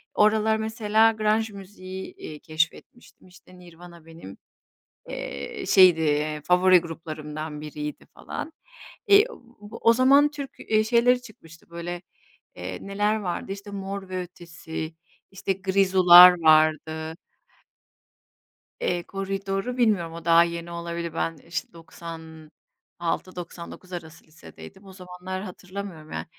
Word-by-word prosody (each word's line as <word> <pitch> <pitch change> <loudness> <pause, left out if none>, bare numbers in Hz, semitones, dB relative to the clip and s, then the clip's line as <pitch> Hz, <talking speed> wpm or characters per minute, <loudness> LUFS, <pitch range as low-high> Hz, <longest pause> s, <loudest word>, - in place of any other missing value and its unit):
O - - +4
aralar 220 0 +2
mesela 220 0 +2
grunge, 220 0 0
müziği, 190 -1 -9
eee, 150 -1 -9
keşfetmiştim. 160 +8 -4
İşte 180 0 -18
Nirvana 170 -1 -14
benim, 165 - -12 0.7
eee, 70 0 -6
şeydi, 180 -4 +6
eee, 150 0 0
favori 180 0 +5
gruplarımdan 155 -2 -7
biriydi 150 0 -7
falan. 320 - -7 0.6
Eee, 405 +1 +7
o 235 - -13
o 230 - +6
zaman 275 +4 +5
Türk, 285 -2 -7
eee, 215 0 +1
şeyleri 245 +2 +3
çıkmıştı 165 -9 -16
böyle, 170 +1 -6 0.5
eee, - - -6
neler 205 +2 0
vardı? 195 -2 -4
İşte 200 +1 -9
Mor 195 -1 -6
ve 185 0 -3
Ötesi, 165 -2 -8 0.4
işte 195 0 -2
Grizu'lar 185 -2 +7
vardı. 155 0 +3 1.7
Eee, 175 -1 -1
Koridor'u 195 +5 -4
bilmiyorum. 205 -9 +1
O 165 0 -9
daha 170 0 +6
yeni 170 0 -5
olabilir. 170 -1 -5
Ben 165 -1 -2
işte 165 +2 -6
96-99 165 +2 -8
arası 165 -2 -9
lisedeydim. 170 +4 -14
O 190 - -13
zamanları 185 0 -7
hatırlamıyorum 185 -4 -8
yani. - - -4
180 Hz, 120 wpm, -25 LUFS, 165-200 Hz, 1.7 s, Eee